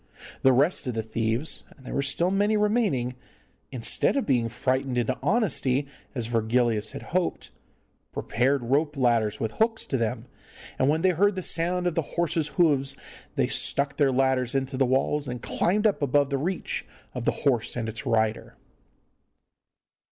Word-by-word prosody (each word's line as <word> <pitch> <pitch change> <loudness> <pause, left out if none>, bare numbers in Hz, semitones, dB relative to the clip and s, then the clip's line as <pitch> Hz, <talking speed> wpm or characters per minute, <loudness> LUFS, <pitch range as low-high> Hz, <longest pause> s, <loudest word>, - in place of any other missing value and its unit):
The 130 - +5
rest 140 +3 +2
of 125 - -2
the 110 - -1
thieves 115 +5 -2 0.2
and 130 - -18
there - - -6
were - - +1
still 170 +6 +1
many 205 +2 +2
remaining 210 - +1 0.6
instead 120 - +1
of 275 - 0
being 120 -4 +1
frightened 130 +2 -1
into 120 +1 +1
honesty, 145 - +1 0.3
as 120 -3 -2
Virgilius 115 -1 0
had - - -7
hoped, 180 -1 -1 0.6
prepared 130 +2 0
rope 145 +5 0
ladders 115 -5 +2
with 110 -2 -2
hooks 225 - 0
to 135 - -1
them, 115 0 -2 0.5
and 130 - +3
when 160 +3 +1
they 185 - +5
heard 200 +4 +2
the 185 - -3
sound 180 +2 0
of 175 - +1
the 165 - +1 0.2
horse's 170 -2 +1
hoofs 140 -5 +1 0.4
they - - +2
stuck 140 0 +1
their 140 -3 +3
ladders 130 -1 +1
into 135 0 -1
the 135 0 +2
walls, 135 +3 +1
and 125 -1 -5
climbed 210 +5 0
up 205 -6 +2
above 145 0 +2
the 140 - +1
reach 180 +5 -2 0.3
of - - -5
the - - +3
horse 125 -5 +1
and 115 -2 -3
its 110 0 -5
rider. 110 -1 0
135 Hz, 170 wpm, -26 LUFS, 120-165 Hz, 0.6 s, The